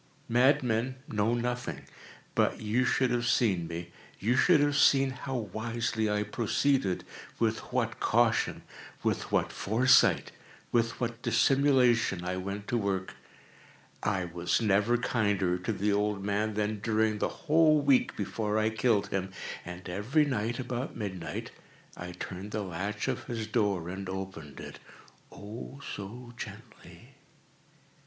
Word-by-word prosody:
Madmen 125 -1 +3
know 110 +2 +1
nothing. 125 +1 -3 0.5
But - - +1
you 110 +4 +1
should 130 0 +2
have 120 -1 0
seen 95 -9 +2
me. 85 +1 -6 0.3
You 115 +6 +1
should 165 +4 +5
have 145 0 +2
seen 135 -2 +5
how 130 +1 -5
wisely 110 0 -2
I 105 0 +1
proceeded—with 115 -1 -1
what - - -1
caution—with - - 0
what - - +1
foresight—with 115 0 +2
what 115 -1 -3
dissimulation 120 -5 +3
I 90 0 -2
went 100 +2 -5
to 120 - +1
work! 95 -2 -2 0.9
I 90 -2 0
was 85 0 0
never 105 +2 +3
kinder 100 -7 +1
to 90 - -2
the 105 0 0
old 105 -1 0
man 105 +1 0
than 105 0 -1
during 110 0 +1
the - - +1 0.2
whole 155 -1 +5
week 140 -3 +3
before 105 +1 -1
I 110 0 +2
killed 110 -4 +1
him. 95 -1 -2 0.3
And 90 +1 -8
every 110 - +1
night, 120 -3 -1
about 125 0 -4
midnight, 95 -5 -5 0.4
I 90 0 -7
turned 95 +3 -6
the 105 0 -3
latch 100 +3 -3
of - - -2
his 115 -3 -3
door 105 -6 0
and 95 +1 -5
opened 95 -7 -6
it—oh, 110 +6 -11
so 120 +5 -8
gently! - - -11
110 Hz, 130 wpm, -30 LUFS, 100-120 Hz, 0.9 s, should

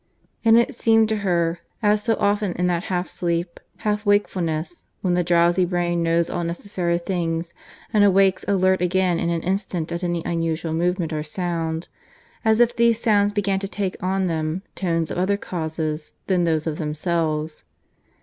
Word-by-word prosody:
And 225 0 +6
it 235 +4 +2
seemed 225 -2 +3
to 220 - +1
her, 170 -4 0 0.2
as 210 0 +3
so 225 +1 +1
often 205 -2 +1
in 180 - -1
that 175 0 0
half 180 -1 -1
sleep, 170 0 -2 0.3
half 210 0 0
wakefulness, 185 - 0
when 180 -2 +1
the 175 0 +2
drowsy 175 +1 +3
brain 175 -1 0
knows 165 0 +2
all 175 - -2
necessary 170 0 -1
things 170 -2 -2 0.4
and 210 -1 +5
awakes 195 -1 +4
alert 190 -1 +2
again 180 -1 +1
in 170 - 0
an 170 -1 -1
instant 185 -3 -2
at 170 +2 -3
any 175 -1 -1
unusual 165 -1 -1
movement 175 0 0
or 155 - -1
sound, 165 0 -3 0.6
as 220 0 +3
if 240 0 +4
these 235 -1 +3
sounds 205 -3 +3
began 200 -2 0
to 195 - -4
take 195 -2 -3
on 190 +1 0
them 160 +1 -2
tones 165 -3 -1
of - - -2
other 200 +2 +1
causes 160 -4 -4
than 180 -2 +2
those 160 -2 +1
of 155 -2 -3
themselves. 155 0 -2
175 Hz, 170 wpm, -23 LUFS, 165-195 Hz, 0.6 s, And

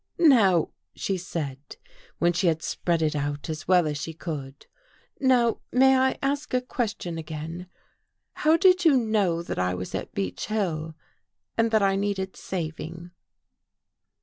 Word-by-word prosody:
" - - -51 0.2
Now," 185 -7 +3 0.2
she 195 - -1
said, 160 -7 -4 0.6
when 175 0 +2
she 175 +2 +1
had 160 -1 +1
spread 170 -2 0
it 155 -1 0
out 145 +2 -3
as 155 -1 -7
well 180 -2 +5
as 150 -1 -2
she 165 - -5
could, 145 -5 -6 0.3
" - - -36
now 250 -4 +3
may 265 +1 +5
I 260 0 +2
ask 280 0 -1
a 250 - +2
question 215 -9 -3
again? 160 +3 -6 0.7
How 315 +2 +3
did 370 0 +5
you 310 -6 +6
know 205 -8 +1
that - - -4
I 90 0 0
was 90 0 -6
at - - -5
Beech 95 -2 -3
Hill 165 -7 -2 0.6
and 230 0 +2
that 220 -2 +3
I 195 0 +3
needed 195 -1 -2
saving? 170 0 -6
175 Hz, 160 wpm, -26 LUFS, 155-225 Hz, 0.7 s, you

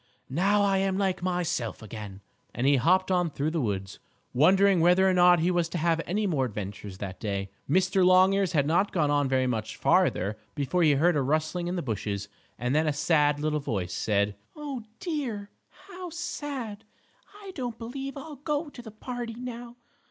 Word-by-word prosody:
"Now 200 +7 +3
I 195 -1 +2
am 190 0 0
like 190 -3 0
myself 175 -11 -2
again," 105 -3 -8 0.3
and 120 - -1
he 140 0 +5
hopped 185 +8 +3
on 180 -2 +2
through 150 +1 -2
the 165 -1 -1
woods, 95 -4 -3 0.3
wondering 190 +7 +5
whether 180 +3 +5
or 190 - +3
not 175 -1 +5
he 175 +2 +2
was 175 -2 +1
to 175 - -3
have 165 0 +1
any 205 +4 0
more 150 -9 +1
adventures 100 -3 -6
that 95 -1 -6
day. 100 -2 -3 0.2
Mr. 185 +4 +3
Longears 185 +1 +4
had 145 -3 +3
not 175 +7 +2
gone 150 -5 +1
on 145 -2 +2
very 130 -1 +2
much 115 -4 -2
farther 105 +4 +2 0.2
before 150 +5 0
he 155 -3 +5
heard 165 +5 +3
a 145 - +2
rustling 155 +5 -1
in 180 - -2
the 175 - -2
bushes, 105 -4 -3 0.3
and 125 +2 -1
then 155 +1 +2
a 150 - +2
sad 150 -1 +2
little 150 0 0
voice 95 -10 -3
said: 100 -1 0 0.2
"Oh, 285 -4 -5 0.2
dear! 250 - -4 0.4
How 365 -2 -8
sad! 290 - -5 0.6
I 395 -2 -9
don't 245 - -4
believe 270 +4 -6
I'll 295 +1 -8
go 295 +2 -2
to 255 - -11
the 230 - -10
party 235 +1 -6
now! 240 -1 -7
175 Hz, 190 wpm, -27 LUFS, 135-205 Hz, 0.6 s, he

